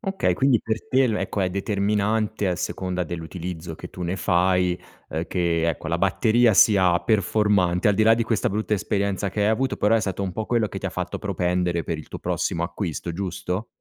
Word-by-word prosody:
Okay, 195 Hz, -2 st, 0 dB
quindi 135 Hz, -4 st, +3 dB
per 110 Hz, 0 st, -3 dB
te 130 Hz, +1 st, +3 dB
il 115 Hz, -4 st, +1 dB
ecco 95 Hz, +2 st, -2 dB
è 90 Hz, -, +1 dB
determinante 105 Hz, +2 st, 0 dB
a 90 Hz, -, +1 dB
seconda 90 Hz, 0 st, -3 dB
dell'utilizzo 85 Hz, 0 st, -6 dB
che -, -, -10 dB
tu 90 Hz, -, -8 dB
ne 85 Hz, +2 st, -1 dB
fai, 90 Hz, 0 st, +2 dB, 0.3 s
uhm, 80 Hz, +2 st, -3 dB
che 85 Hz, -2 st, 0 dB
ecco 80 Hz, -, -3 dB
la -, -, 0 dB
batteria 115 Hz, 0 st, +3 dB
sia 95 Hz, -4 st, +5 dB
performante, 100 Hz, -3 st, +2 dB
al 105 Hz, -, +3 dB
di 110 Hz, -, +3 dB
là 115 Hz, +1 st, +6 dB
di 115 Hz, -, 0 dB
questa 110 Hz, -1 st, 0 dB
brutta 105 Hz, +1 st, -1 dB
esperienza 100 Hz, 0 st, -1 dB
che 105 Hz, -, -3 dB
hai 105 Hz, -, +3 dB
avuto, 130 Hz, +4 st, 0 dB
però 105 Hz, +2 st, +3 dB
è 110 Hz, -, +1 dB
stato 100 Hz, -1 st, -3 dB
un 95 Hz, -, -2 dB
po' 110 Hz, +3 st, -4 dB
quello 115 Hz, -3 st, +1 dB
che -, -, -6 dB
ti -, -, -4 dB
ha -, -, -3 dB
fatto -, -, -4 dB
propendere 90 Hz, -1 st, -1 dB
per 80 Hz, -2 st, -3 dB
il 75 Hz, -, -9 dB
tuo -, -, -8 dB
prossimo 85 Hz, -, -1 dB
acquisto, 85 Hz, -1 st, -4 dB
giusto? 90 Hz, +3 st, -3 dB
95 Hz, 215 wpm, -24 LUFS, 90-110 Hz, 0.3 s, là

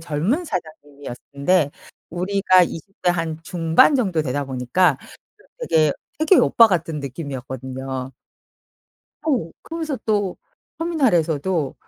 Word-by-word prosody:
젊은 170 Hz, -, -1 dB
사장님이었는데 145 Hz, -, -2 dB, 0.4 s
우리가 185 Hz, +1 st, +3 dB
20 170 Hz, +4 st, -9 dB
대 180 Hz, -, +4 dB
한 165 Hz, -2 st, -3 dB
중반 165 Hz, -, +4 dB
정도 190 Hz, -, +1 dB
되다 145 Hz, +1 st, -2 dB
보니까 135 Hz, +4 st, +1 dB, 0.4 s
또 -, -, -10 dB
되게, 155 Hz, -3 st, +4 dB, 0.3 s
되게 315 Hz, +5 st, +4 dB
오빠 230 Hz, -, +6 dB
같은 165 Hz, -5 st, -1 dB
느낌이었거든요. 130 Hz, -2 st, -6 dB, 1.2 s
어. 245 Hz, -, 0 dB
그러면서 320 Hz, -4 st, -4 dB
또 205 Hz, -4 st, 0 dB, 0.4 s
터미널에서도 175 Hz, -, +1 dB
165 Hz, 260 characters per minute, -21 LUFS, 140-195 Hz, 1.2 s, 오빠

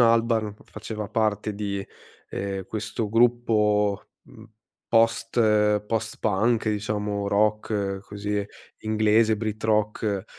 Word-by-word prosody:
Albarn 115 Hz, -2 st, +3 dB
faceva 105 Hz, -2 st, -6 dB
parte 105 Hz, -1 st, 0 dB
di, 100 Hz, -1 st, -3 dB, 0.5 s
ehm, 95 Hz, -1 st, -3 dB
questo 110 Hz, 0 st, -3 dB
gruppo, 105 Hz, -3 st, +2 dB, 0.2 s
mhmm, -, -, -16 dB, 0.4 s
post 115 Hz, +1 st, +2 dB, 0.5 s
post-punk, 110 Hz, 0 st, 0 dB
diciamo, 105 Hz, -1 st, -2 dB
rock 105 Hz, -1 st, 0 dB
così, 105 Hz, 0 st, -3 dB, 0.3 s
inglese, 110 Hz, 0 st, +3 dB
brit 110 Hz, 0 st, -4 dB
rock, 105 Hz, -2 st, 0 dB
105 Hz, 90 wpm, -25 LUFS, 105-110 Hz, 0.5 s, Albarn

